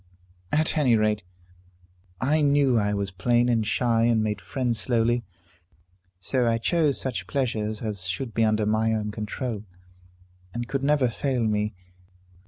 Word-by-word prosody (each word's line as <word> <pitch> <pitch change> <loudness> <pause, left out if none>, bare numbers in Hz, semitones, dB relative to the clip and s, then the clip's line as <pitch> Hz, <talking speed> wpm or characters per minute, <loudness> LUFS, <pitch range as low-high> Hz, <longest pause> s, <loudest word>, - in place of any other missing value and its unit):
"At 155 +1 +2
any 130 -6 +4
rate, 105 -1 +1 1.0
I 150 +4 +2
knew 140 -3 +3
I 105 -2 +2
was 100 -1 -2
plain 120 +6 +2
and 115 -2 +2
shy, 115 0 +2
and 115 -2 +3
made 105 -2 -2
friends 120 +4 -1
slowly. 120 0 +1 1.0
So 125 +7 0
I 115 0 +2
chose 150 +3 +1
such 105 -9 -3
pleasures 110 -2 -2
as 100 -4 -2
should 110 +6 -3
be 115 - +2
under 110 -1 +2
my 110 +1 +1
own 105 -1 -2
control, 110 +1 -4 0.9
and 120 0 -3
could 135 +1 -2
never 145 -2 +3
fail 125 +1 -1
me. 105 -1 0
115 Hz, 150 wpm, -25 LUFS, 105-130 Hz, 1.0 s, any